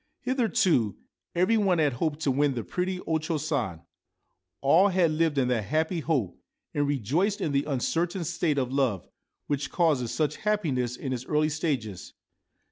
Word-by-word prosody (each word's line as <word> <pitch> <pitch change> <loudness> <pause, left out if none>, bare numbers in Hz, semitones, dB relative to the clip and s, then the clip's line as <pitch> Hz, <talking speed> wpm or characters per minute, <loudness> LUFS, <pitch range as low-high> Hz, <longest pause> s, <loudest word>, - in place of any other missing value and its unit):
Hitherto 220 - +1 0.4
every 185 +6 +3
one 195 -4 +2
had 150 -4 +2
hoped 150 +4 -2
to 140 - +2
win 140 0 +1
the 120 - -3
pretty 185 0 -2
O 160 -1 0
Cho 160 +1 -2
San; 130 - -2 0.8
all 160 +8 +5
had 180 -4 +2
lived 155 -1 +1
in 130 -2 +3
that 115 -4 0
happy 160 - 0
hope, 135 - -1 0.3
and 145 -1 +1
rejoiced 150 - 0
in 165 -6 -1
the 140 0 +1
uncertain 165 +6 -1
state 155 -1 0
of 130 -1 -1
love, 130 -10 0 0.4
which 145 -1 -2
causes 150 -9 +1
such 155 -1 -1
happiness 150 - 0
in 130 0 -4
its 125 0 -5
early 155 0 +2
stages. 140 - -3
150 Hz, 165 wpm, -27 LUFS, 130-170 Hz, 0.8 s, all